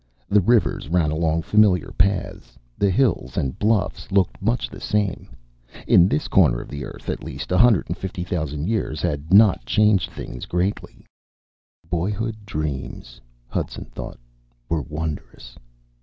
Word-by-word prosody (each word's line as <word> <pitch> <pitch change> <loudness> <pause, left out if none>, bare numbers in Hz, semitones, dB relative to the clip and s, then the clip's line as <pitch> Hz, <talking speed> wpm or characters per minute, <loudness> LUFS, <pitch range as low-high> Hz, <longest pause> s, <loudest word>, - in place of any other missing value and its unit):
The 105 0 +5
rivers 110 -6 +2
ran 85 -3 +2
along 80 +1 0
familiar 105 -4 +3
paths, 95 -5 -1 0.2
the 100 - +2
hills 110 0 +1
and 65 -1 -2
bluffs 105 -2 0
looked 95 -2 +1
much 115 +4 0
the - - -11
same. 105 -3 -1 0.6
In 90 - +6
this 75 - -1
corner - - +4
of - - -9
the 70 -1 -6
Earth, - - -11
at - - -3
least, - - -7
150,000 90 - +1
years 105 -8 -2
had 75 -2 -2
not 105 0 +6
changed 105 -5 +3
things 60 - -8
greatly. 90 +3 -3 0.8
Boyhood 105 +5 -3
dreams, 70 -6 -5 0.3
Hudson - - -4
thought, - - -7 0.5
were 80 -1 0
wondrous. 75 -4 -6
90 Hz, 130 wpm, -22 LUFS, 75-105 Hz, 0.8 s, In